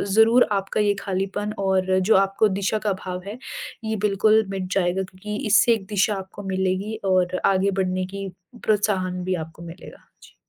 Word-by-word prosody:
ज़रूर 225 +3 +6
आपका 195 +1 0
ये 205 -1 +3
खालीपन 195 +2 -2
और 190 -1 +1
जो 195 +4 +3
आपको 195 +2 +3
दिशा 200 +2 0
का 200 - +2
भाव 180 -1 -4
है 210 +3 -6 0.5
ये 220 0 -1
बिल्कुल 215 +2 +3
मिट 190 -1 -3
जाएगा 185 0 +1
क्योंकि 190 +3 -7
इससे 215 +3 +5
एक 215 -4 -3
दिशा 205 0 +1
आपको 190 +1 -8
मिलेगी 190 +3 -1 0.2
और 185 0 +1
आगे 195 0 +3
बढ़ने 185 0 -1
की 195 0 -4 0.4
प्रोत्साहन 190 -4 0
भी 185 0 0
आपको 165 +1 -14
मिलेगा। 170 +2 -11 0.2
जी। - - -17
195 Hz, 170 wpm, -23 LUFS, 185-210 Hz, 0.5 s, ज़रूर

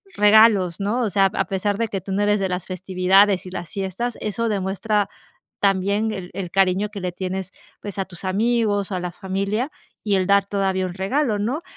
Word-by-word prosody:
regalos, 210 -4 +5
¿no? 215 +6 0
O 220 - +1
sea, 195 +1 +3
a - - 0
pesar 200 +1 -1
de 230 -1 0
que 195 -3 -4
tú 195 - -7
no 200 +2 0
eres 205 0 +2
de 190 -1 -1
las 180 -1 -3
festividades 185 +1 +3
y 180 - -8
las 175 -2 -6
fiestas, 195 +5 -3
eso 225 +2 -1
demuestra 200 +1 0 0.5
también 200 +2 +1
el 190 -3 -6
el 185 -3 -4
cariño 195 +2 +2
que 200 -2 -7
le 180 -1 -3
tienes, 185 0 -4 0.3
pues, 205 -1 -7
a 195 - 0
tus 180 0 -11
amigos, 205 0 +1
o - - 0
a - - -2
la 175 -1 -4
familia 200 - -2 0.3
y 205 -2 +2
el 185 -1 +1
dar 200 0 +4
todavía 190 -2 0
un 175 - -6
regalo, 215 +3 0
¿no? 255 +11 -2
195 Hz, 210 wpm, -22 LUFS, 185-210 Hz, 0.5 s, regalos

